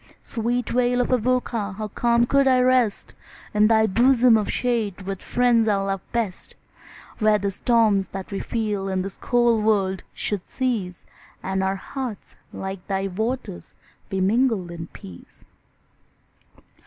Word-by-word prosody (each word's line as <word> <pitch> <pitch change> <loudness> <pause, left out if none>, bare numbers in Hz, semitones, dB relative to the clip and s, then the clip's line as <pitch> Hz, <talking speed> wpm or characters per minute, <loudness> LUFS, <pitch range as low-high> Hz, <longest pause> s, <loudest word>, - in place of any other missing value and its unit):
Sweet 240 +1 -2
vale 245 0 +1
of 245 - 0
Avoca! 240 -4 0
how 215 +2 -5
calm 235 +2 +2
could 275 +2 +3
I 255 -1 +4
rest 250 -4 +2 0.4
In 210 0 +4
thy 220 0 +4
bosom 240 +3 +4
of 215 -2 0
shade, 225 -6 -1
with 195 0 -4
the - - -17
friends 240 -2 +3
I 210 - +3
love 195 -1 -2
best, 225 -6 -3 0.6
Where 215 -1 +4
the 200 0 -2
storms 215 -2 +2
that 195 0 -8
we 195 - -3
feel 210 -4 -2
in 190 -1 -1
this 195 0 -7
cold 240 -3 +2
world 195 -3 +1
should 205 -4 -4
cease, 220 -9 -2 0.4
And 190 0 -1
our 190 0 0
hearts, 245 +1 -7 0.2
like 190 -1 -6
thy 195 0 -1
waters, 220 - -4 0.3
be 195 - -2
mingled 210 -3 +1
in 165 -1 -7
peace. 90 - -14
215 Hz, 150 wpm, -23 LUFS, 195-240 Hz, 0.6 s, I